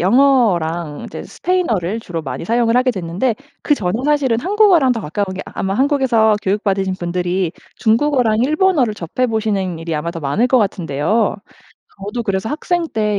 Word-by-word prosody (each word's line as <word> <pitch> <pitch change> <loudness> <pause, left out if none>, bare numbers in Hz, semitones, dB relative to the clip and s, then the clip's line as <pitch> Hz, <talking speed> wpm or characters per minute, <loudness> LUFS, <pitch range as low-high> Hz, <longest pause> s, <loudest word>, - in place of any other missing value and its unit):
영어랑 180 - +2
이제 - - -7
스페인어를 230 - -1
주로 175 -6 -5
많이 135 -2 -6
사용을 230 +3 +2
하게 255 +1 +3
됐는데 190 +4 -1 0.3
그전에 205 -12 +1
사실은 285 -6 +2
한국어랑 365 - +4
더 230 - -3
가까운 200 +3 -3
게 190 - -5
아마 195 - -3
한국에서 255 -3 +3
교육받으신 195 -1 0
분들이 175 0 -1 0.2
중국어랑 235 -1 +2
일본어를 305 - +2
접해 210 +6 -2
보시는 205 -6 -1
일이 165 0 -4
아마 155 +3 -2
더 170 - -7
많을 150 - +1
것 255 0 +3
같은데요. 195 - 0 0.6
저도 205 +5 -4
그래서 195 -1 -2
학생 335 +2 -1
때 210 -4 0
215 Hz, 380 characters per minute, -18 LUFS, 180-255 Hz, 0.6 s, 한국어랑